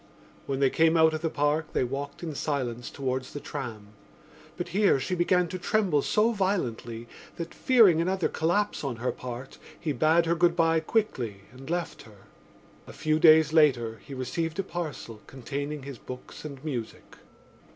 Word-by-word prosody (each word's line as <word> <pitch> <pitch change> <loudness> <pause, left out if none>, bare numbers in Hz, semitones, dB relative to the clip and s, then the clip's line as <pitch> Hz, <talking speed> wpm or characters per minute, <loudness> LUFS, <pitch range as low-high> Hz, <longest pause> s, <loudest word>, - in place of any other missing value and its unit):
When 135 -1 -2
they 135 - +4
came 165 +1 +4
out 160 0 +5
of 155 - -3
the 165 - 0
Park 150 +1 0
they - - +2
walked 140 +5 -5
in 160 -2 -4
silence 125 -5 -3
towards 130 -1 -3
the 145 - -4
tram; 120 -9 -7 0.7
but - - -4
here 195 -6 +3
she 160 +8 -3
began 180 0 +2
to 185 +1 -5
tremble 185 -6 +2
so 215 +8 +2
violently 120 - -2 0.3
that, 170 0 -6
fearing 215 -11 +5
another 185 +1 +1
collapse 185 +6 0
on 135 -4 -2
her 120 +3 -2
part, 125 +1 -8 0.2
he 160 -3 -2
bade 155 +5 +3
her 165 - +2
good 170 0 +3
bye 165 -1 +3
quickly 130 - -1
and 135 +3 -12
left 175 0 -3
her. 105 -4 -16 0.6
A - - -10
few 155 0 0
days 160 -1 +6
later 120 -8 +3
he 140 - -9
received 160 +6 -3
a 195 - 0
parcel 155 - -6
containing 140 +3 -5
his 135 -4 -8
books 125 0 -9
and 140 -1 -8
music. 125 -7 -6
150 Hz, 170 wpm, -27 LUFS, 130-170 Hz, 0.7 s, days